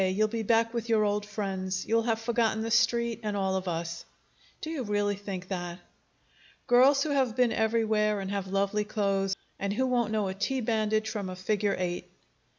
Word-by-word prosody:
You'll 210 +3 +1
be 230 0 -2
back 230 +1 +2
with 235 -1 -3
your 220 -2 +4
old 205 0 0
friends. 190 -2 -3
You'll 230 +1 +2
have 225 -1 0
forgotten 225 -1 0
the 225 - -3
Street 235 -1 +2
and 210 -2 -2
all 190 -1 0
of 190 0 -2
us." 170 0 -3 0.6
"Do 315 - -5
you 310 -5 -3
really 205 -2 0
think 190 -2 -6
that?" 175 -2 -4 0.9
"Girls 270 +3 +5
who 310 - -2
have 260 -5 +1
been 250 -2 +3
everywhere, 220 -2 +1
and 195 0 -4
have 200 -1 -2
lovely 200 +2 0
clothes, 195 -2 0 0.2
and 200 0 -1
who 260 +5 +1
won't 240 -4 +1
know 215 -2 0
a 190 - -2
T 200 +8 -1
bandage 220 -2 0
from 205 -4 -3
a 185 - -5
figure 200 +2 0
eight!" 180 -1 -3
210 Hz, 195 wpm, -29 LUFS, 195-230 Hz, 0.9 s, Girls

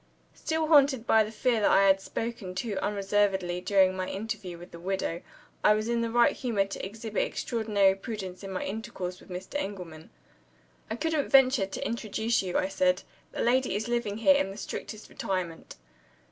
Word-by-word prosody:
Still 320 0 -1
haunted 280 -6 +4
by 220 -2 +5
the 215 - -6
fear 230 +1 +1
that - - +4
I 195 - +5
had 195 0 +4
spoken 215 -4 -5
too 200 0 -2
unreservedly 195 -3 0
during 190 -1 +3
my 185 0 -3
interview 200 -3 -5
with 175 +2 -12
the 170 - -10
widow, 180 -2 -2 0.4
I 210 - +6
was 215 +1 -2
in 235 0 +1
the 230 - -1
right 235 +1 +4
humor 225 -7 0
to 195 - -7
exhibit 215 +2 -3
extraordinary 210 -5 +1
prudence 195 -2 -6
in 195 - -6
my 185 - -3
intercourse 195 -4 -5
with - - -18
Mr. 185 +9 -5
Engelman. 175 -5 -7 0.8
"I - - -2
couldn't 315 +2 -1
venture 260 -6 +5
to 195 - -5
introduce 225 0 -1
you," 185 -2 -2
I 185 - +1
said; 275 +7 +1 0.3
"the - - -4
lady 250 -3 +2
is 210 +2 -2
living 235 -4 -1
here 255 +6 +5
in 195 - 0
the 195 - -8
strictest 215 0 -6
retirement." 180 -4 -4
205 Hz, 185 wpm, -28 LUFS, 190-235 Hz, 0.8 s, I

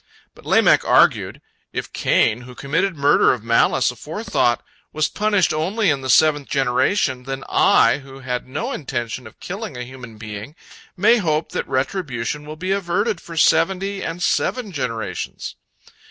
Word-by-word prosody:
But - - -16
Lamech - - +4
argued, - - +3 0.3
"If - - -5
Cain, 110 +2 +2
who 125 0 -12
committed 165 +9 -1
murder 140 0 +4
of 115 - -12
malice 115 +2 +3
aforethought, 150 - -1 0.3
was 155 -1 +1
punished 205 -6 +1
only 185 +5 +1
in 140 -2 -1
the 130 - -5
seventh 145 +1 +4
generation, 130 +1 +1
then 135 0 -5
I, - - +4
who 135 -1 -12
had 125 -1 -4
no 140 +4 -4
intention 125 -3 -4
of - - -17
killing 195 - -6
a 125 - -4
human 125 -3 -11
being, 105 +5 -8 0.4
may 215 +6 +5
hope 160 -6 -1
that - - -3
retribution 135 - -2
will 155 - -7
be 185 +4 -3
averted 195 +1 0
for 165 -1 -10
seventy 190 +5 +2
and 170 +1 -4
seven 245 -5 0
generations." 115 - -4
145 Hz, 155 wpm, -21 LUFS, 125-185 Hz, 0.4 s, may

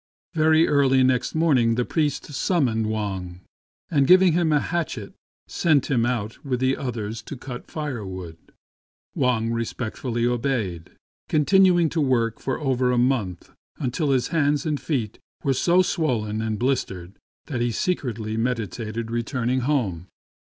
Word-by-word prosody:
Very 160 0 +4
early 135 -2 +4
next 130 +2 +1
morning 130 -8 +3
the 125 +1 0
priest 150 -4 -1
sum 165 +2 +1
moned 110 -2 0
Wang, 95 -5 -4 0.5
and 140 -4 +3
giving 185 -1 +6
him 170 -1 +2
a 150 - +4
hatchet 145 - -3 0.3
sent 155 -5 +1
him 120 -3 +2
out 115 -3 -3
with 130 -3 -2
the 130 +1 +2
others 115 -4 -4
to 145 - -8
cut 125 0 -8
firewood. 100 - -5 0.8
Wang 115 -3 +1
respectfully 115 +1 -3
obeyed, 120 -8 -1 0.4
continuing 175 +2 +4
to 160 - -1
work 120 -5 +1
for 130 - -3
over 130 -4 +1
a 125 - +1
month 120 -8 0 0.3
until 145 +3 -1
his 130 -3 +1
hands 150 -1 +1
and 150 -2 -1
feet 120 -9 -2 0.2
were 135 - +2
so 175 +7 +3
swollen 110 -12 -1
and 110 -1 -2
blistered 100 -8 -2 0.3
that 125 -5 -3
he 120 - +1
secretly 115 - -2
meditated 115 -1 -3
returning 120 +2 -1
home. 115 - -1
125 Hz, 145 wpm, -24 LUFS, 115-145 Hz, 0.8 s, giving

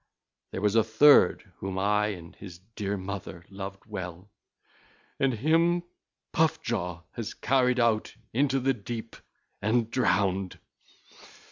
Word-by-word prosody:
There 95 - -5
was 105 -1 +3
a 115 -1 +5
third 140 +7 +5
whom 95 0 -4
I 105 +2 +2
and 85 -5 -7
his 90 -4 -10 0.2
dear 100 -1 -2
mother 95 -3 -6
loved 95 0 -7
well, 95 -2 -7 0.9
and 135 -1 +3
him 165 +7 +2 0.5
Puff 160 -1 +2
jaw 90 -7 -3
has 115 -3 -6
carried 125 -1 +2
out 115 -2 +1 0.2
into 135 +2 +2
the 135 +1 +2
deep 115 0 -7 0.5
and 115 +2 +1
drowned. 95 -6 +1
105 Hz, 125 wpm, -28 LUFS, 95-125 Hz, 0.9 s, a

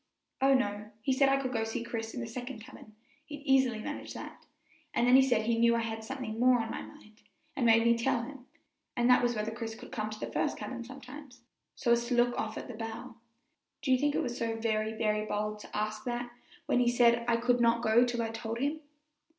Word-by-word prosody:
"Oh, 270 0 +5
no; 210 -4 -1
he 265 - +2
said 270 +1 +4
I 275 - +4
could 260 -1 -3
go 225 - 0
to 225 - 0
see 225 +1 -3
Chris 225 -1 -5
in 250 - -3
the - - -3
second 245 +1 -6
cabin 215 -1 -13 0.3
he'd 295 -2 -8
easily 265 -4 +3
manage 215 - -6
that - - -9 0.5
and 240 - +3
then 250 +1 +6
he 265 - +9
said 245 -5 +2
he 230 0 +1
knew 235 0 +5
I 230 - +1
had 225 -1 -4
something 240 -2 -5
more 250 0 +5
on 225 0 -3
my - - -4
mind, 215 +1 -14 0.3
and 245 -4 +1
made 225 0 +6
me 235 0 +5
tell 235 0 0
him, 265 0 -10 0.5
and 240 0 +3
that 250 - +6
was 240 -1 +1
whether 215 +1 -2
Chris 225 -1 -5
could - - -12
come 215 -1 -3
to 215 0 -8
the - - -5
first - - 0
cabin 245 -2 -5
sometimes, 260 0 -11 0.3
so 240 - 0
as 235 0 +3
to 245 - 0
look 240 0 +3
off 220 0 -3
at - - -6
the 245 - -7
bow. 225 +3 -6 0.7
Do 275 - 0
you 255 - +6
think 290 +1 +1
it - - +1
was 240 -1 -3
so 230 -1 -1
very, 220 -1 0
very 215 -1 0
bold 210 0 -2
to - - -8
ask 215 0 -2
that 240 0 -3 0.3
when - - +2
he 245 -1 +4
said 235 -1 +4
I 235 -1 +3
could 245 +1 +2
not 235 0 +3
go 225 +1 +5
till 240 -1 -1
I 225 - -2
told 225 0 -4
him?" 285 +5 -1
235 Hz, 245 wpm, -31 LUFS, 225-250 Hz, 0.7 s, he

